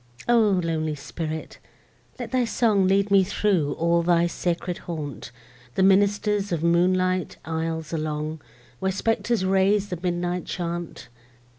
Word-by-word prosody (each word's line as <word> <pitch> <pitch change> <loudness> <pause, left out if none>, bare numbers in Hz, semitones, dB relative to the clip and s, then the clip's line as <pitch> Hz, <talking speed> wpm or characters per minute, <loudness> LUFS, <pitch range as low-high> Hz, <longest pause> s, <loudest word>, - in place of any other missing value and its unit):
O 240 0 +5 0.2
lonely 160 -2 -1
spirit! 155 +2 -6 0.6
let 245 -3 -6
thy 255 -1 +2
song 220 -5 +2
Lead 200 +1 +2
me 195 -1 +6
through 185 -6 0
all 170 +1 +2
thy 170 0 +3
sacred 175 0 -2
haunt; 145 - -5 0.4
The 190 - +2
minister's 205 +1 +3
moonlight 185 +1 +2
aisles 160 0 -3
along, 155 0 -3 0.4
Where 190 0 0
spectres 225 +1 0
raise 195 +2 +2
the 180 -3 -4
midnight 175 0 -2
chaunt. 175 -1 -5
180 Hz, 125 wpm, -24 LUFS, 165-200 Hz, 0.6 s, me